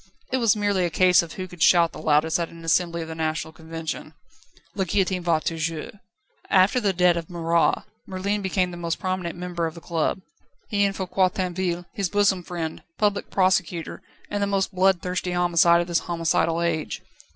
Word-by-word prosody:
It 260 - +2
was 230 -4 +3
merely 205 -3 +1
a 175 - +1
case 180 +2 +5
of 170 -1 -8
who 185 -1 -5
could 175 -2 -13
shout 170 0 +5
the - - -9
loudest 155 +2 +2
at 170 - -2
an 165 0 -12
assembly 170 0 +1
of - - -9
the 160 - -6
National 160 0 -3
Convention. 160 -1 -6 0.6
"La 195 - -1
guillotine 185 0 0
va 170 -2 +2
toujours!" 160 0 -3 0.6
After 190 +6 +4
the 205 -4 +1
death 180 -1 +3
of 165 -1 -5
Marat, 170 -1 +1 0.2
Merlin 200 +2 -2
became 185 -1 0
the 175 - -8
most 170 -1 -2
prominent 185 -2 -3
member 175 -2 -2
of 160 - -8
the - - -8
club 165 +2 -1 0.5
he 200 -1 +2
and 195 0 -1
Foucquier 185 0 +1
Tinville, 180 -1 -2
his 195 -3 -1
bosom 200 -2 +2
friend, 165 -2 -5 0.2
Public 205 -1 0
Prosecutor, 185 -3 0 0.3
and 205 - -1
the 200 - +1
most 195 -1 0
bloodthirsty 185 -1 +1
homicide 170 -1 +4
of 175 - -4
this 170 -2 +1
homicidal 165 0 0
age. 160 -2 -2
175 Hz, 185 wpm, -24 LUFS, 165-190 Hz, 0.6 s, case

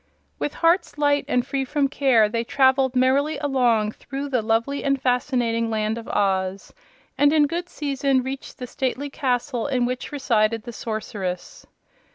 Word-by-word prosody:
With 145 0 -3
hearts 340 -1 +2
light 290 -1 +2
and 245 0 +1
free 270 0 -2
from 280 +1 0
care 265 -6 +3
they 230 +2 -2
traveled 265 0 +2
merrily 270 +4 +2
along 245 -7 +1
through 275 +5 -6
the 255 -4 +1
lovely 230 +6 0
and 275 -1 +1
fascinating 245 -2 0
Land 220 +1 -1
of 230 - -11
Oz, 190 -1 -1 0.5
and 290 0 +5
in 300 -1 +4
good 345 +4 -3
season 275 -2 0
reached 265 +1 -6
the 250 - -5
stately 265 +3 -3
castle 250 -2 -1
in 255 -3 +1
which 250 +3 -4
resided 230 -6 +1
the 240 0 -8
Sorceress. 210 -5 -5
255 Hz, 160 wpm, -23 LUFS, 230-280 Hz, 0.5 s, and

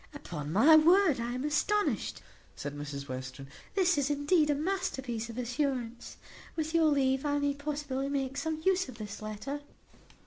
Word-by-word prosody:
"Upon 155 - -6
my 275 - +7
word 335 -2 +5
I 235 +1 -2
am 255 +1 -3
astonished," 410 +8 0 0.3
said 145 0 -5
Mrs 140 -1 -6
Western; 130 +1 -6 0.3
"this 370 -5 +3
is, 280 0 0
indeed, 295 +2 +2
a 290 - +3
masterpiece 275 - -2
of 230 - -8
assurance. 245 -1 -2 0.4
With 315 0 -2
your 330 -1 +4
leave 270 -3 +2
I 290 -1 +1
may 285 0 +1
possibly 285 -2 -3
make 270 -1 -2
some 315 +2 -3
use 375 -5 +2
of 240 - -10
this 210 -2 -7
letter." 215 +7 -5
280 Hz, 165 wpm, -31 LUFS, 235-310 Hz, 0.4 s, my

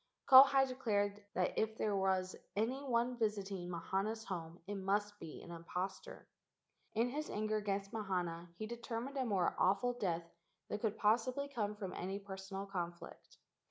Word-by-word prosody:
Kauhi 270 0 +9
declared 205 -5 0
that 180 0 +1
if 220 0 0
there 210 -2 +1
was 190 -1 +1 0.2
any 245 +7 0
one 245 -1 +1
visit¬ 210 -3 0
ing 180 -2 -4
Mahana's 195 +6 -1
home 170 -4 -5
it 205 - -4
must 205 +1 0
be 160 -2 -8
an - - -9
impostor. 180 - -5 0.7
In 230 +3 +3
his 300 +4 -3
anger 215 +1 0
against 200 -1 -2
Mahana 175 -5 -2
he 215 - -3
determined 235 +3 -4
a 260 - +1
more 195 -6 +1
awful 200 +7 +3
death 175 -8 -1 0.4
than 210 - -2
could 220 -1 -1
possibly 245 +6 +2
come 215 -7 -2
from 195 -3 -5
any 190 +2 -3
personal 195 0 -6
conflict. 175 -3 -6
205 Hz, 160 wpm, -37 LUFS, 190-230 Hz, 0.7 s, Kauhi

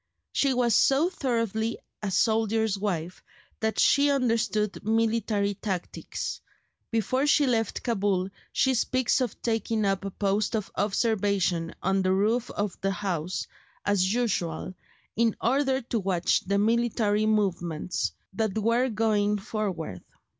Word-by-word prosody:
She 275 -2 +2
was 240 -2 +2
so 280 - +4
thoroughly 230 - -1 0.2
a 210 - -2
soldier's 220 +1 +2
wife 180 -4 -3 0.4
that 220 -2 -1
she 285 0 +5
understood 230 -6 0
military 220 -2 +1
tactics: 190 -3 -4 0.5
before 255 +5 0
she 295 0 +4
left 225 -4 0
Cabul 200 -5 0 0.2
she 265 - +2
speaks 255 +1 +1
of 245 -5 -2
taking 225 -2 0
up 195 -1 0
a 200 - -3
post 200 +3 0
of 215 -3 -3
observation 200 -5 0
on 195 +1 +2
the 185 0 +2
roof 220 +5 +1
of 205 -2 -3
the 195 - +1
house, 185 -3 -2 0.4
"as 195 -2 +2
usual," 185 -8 -1 0.4
in 230 0 +2
order 265 +2 +1
to 235 -1 -2
watch 185 -3 +1
the 200 +1 +2
military 215 -1 +2
movements 180 -6 0 0.2
that 215 0 -1
were 230 +4 +2
going 210 -2 +1
forward. 195 - -4
215 Hz, 130 wpm, -27 LUFS, 195-230 Hz, 0.5 s, she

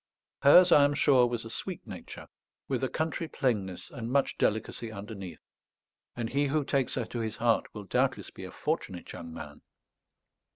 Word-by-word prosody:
Hers, 175 +6 +8
I 145 - +8
am 145 0 +3
sure, 130 -4 +5
was 120 -1 -3
a 115 - -7
sweet - - -5
nature, - - -9 0.4
with 135 -1 -1
a 130 - +1
country 160 +1 -2
plainness 105 - -2
and 115 0 -5
much 140 +1 +2
delicacy 110 +1 -1
underneath; 100 -5 -8 0.7
and 115 -2 -3
he 140 +1 +2
who 145 +1 0
takes 135 -2 0
her 125 - -1
to 120 +2 -5
his 110 -1 -3
heart 115 0 +1
will 105 - -6
doubtless 95 - 0
be - - -10
a - - -8
fortunate 90 -2 -3
young 85 -1 -8
man. 75 -2 -9
120 Hz, 175 wpm, -29 LUFS, 105-140 Hz, 0.7 s, Hers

